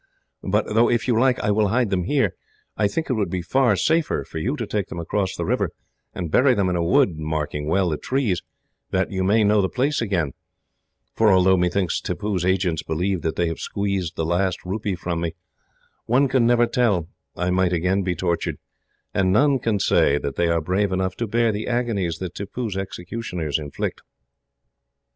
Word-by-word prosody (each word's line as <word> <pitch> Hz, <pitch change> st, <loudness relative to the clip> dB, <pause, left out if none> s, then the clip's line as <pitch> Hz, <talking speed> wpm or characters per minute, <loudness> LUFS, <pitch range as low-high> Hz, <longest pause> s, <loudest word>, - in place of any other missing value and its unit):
But 105 Hz, +3 st, 0 dB
though, 115 Hz, +2 st, +4 dB
if 120 Hz, +1 st, 0 dB
you 115 Hz, -3 st, +3 dB
like, 130 Hz, 0 st, +3 dB
I 105 Hz, -, +1 dB
will 105 Hz, 0 st, +2 dB
hide 115 Hz, +1 st, +1 dB
them 90 Hz, -2 st, 0 dB
here, 130 Hz, -6 st, +1 dB, 0.4 s
I 105 Hz, -, +2 dB
think 160 Hz, +10 st, -3 dB
it 130 Hz, -, 0 dB
would 105 Hz, -6 st, -1 dB
be 90 Hz, 0 st, -3 dB
far 125 Hz, +3 st, +3 dB
safer 160 Hz, -, +1 dB
for 80 Hz, -, -6 dB
you 125 Hz, -, -1 dB
to 120 Hz, -, -3 dB
take 105 Hz, -2 st, -2 dB
them -, -, -8 dB
across 95 Hz, +3 st, -1 dB
the -, -, -3 dB
river, -, -, 0 dB, 0.4 s
and 85 Hz, -4 st, -5 dB
bury 130 Hz, -, +4 dB
them 100 Hz, -3 st, +1 dB
in 90 Hz, -, 0 dB
a 85 Hz, -, 0 dB
wood, 90 Hz, -, +3 dB
marking 75 Hz, -1 st, -3 dB
well 95 Hz, +2 st, +2 dB
the 75 Hz, -, -1 dB
trees, 120 Hz, -, -1 dB, 0.5 s
that 95 Hz, 0 st, 0 dB
you 95 Hz, -1 st, -1 dB
may 105 Hz, +4 st, +3 dB
know 105 Hz, 0 st, +4 dB
the 95 Hz, -, 0 dB
place 140 Hz, +3 st, 0 dB
again; 90 Hz, -10 st, 0 dB, 0.8 s
for 110 Hz, -2 st, +4 dB
although 95 Hz, 0 st, +5 dB
methinks 90 Hz, 0 st, 0 dB
Tippoo's 100 Hz, -4 st, -2 dB
agents 90 Hz, -3 st, +1 dB
believe 90 Hz, +3 st, -1 dB
that 80 Hz, +1 st, -2 dB
they 85 Hz, -, +1 dB
have 80 Hz, -, -4 dB
squeezed 100 Hz, -4 st, -2 dB
the 80 Hz, -, -1 dB
last 90 Hz, +2 st, +1 dB
rupee 100 Hz, +1 st, -2 dB
from 85 Hz, -1 st, -3 dB
me, 85 Hz, -1 st, -3 dB, 0.7 s
one 130 Hz, +4 st, +3 dB
can 125 Hz, -2 st, +2 dB
never 120 Hz, 0 st, +4 dB
tell 105 Hz, -10 st, +1 dB, 0.3 s
I 90 Hz, +1 st, -1 dB
might 90 Hz, -1 st, +2 dB
again 90 Hz, +3 st, +1 dB
be 90 Hz, -2 st, -1 dB
tortured, 85 Hz, -2 st, -1 dB, 0.6 s
and 95 Hz, -1 st, +2 dB
none 135 Hz, +6 st, +4 dB
can 115 Hz, -3 st, 0 dB
say 70 Hz, -6 st, +3 dB
that 70 Hz, -1 st, -4 dB
they 85 Hz, +2 st, +1 dB
are 85 Hz, -1 st, +1 dB
brave 95 Hz, +5 st, 0 dB
enough 95 Hz, 0 st, -1 dB
to 115 Hz, -, -2 dB
bear 115 Hz, +2 st, +2 dB
the 105 Hz, +1 st, -4 dB
agonies 115 Hz, -9 st, -1 dB
that 90 Hz, 0 st, -5 dB
Tippoo's 100 Hz, +2 st, -4 dB
executioners 90 Hz, -4 st, -4 dB
inflict. 75 Hz, -2 st, -4 dB
95 Hz, 200 wpm, -23 LUFS, 85-115 Hz, 0.8 s, although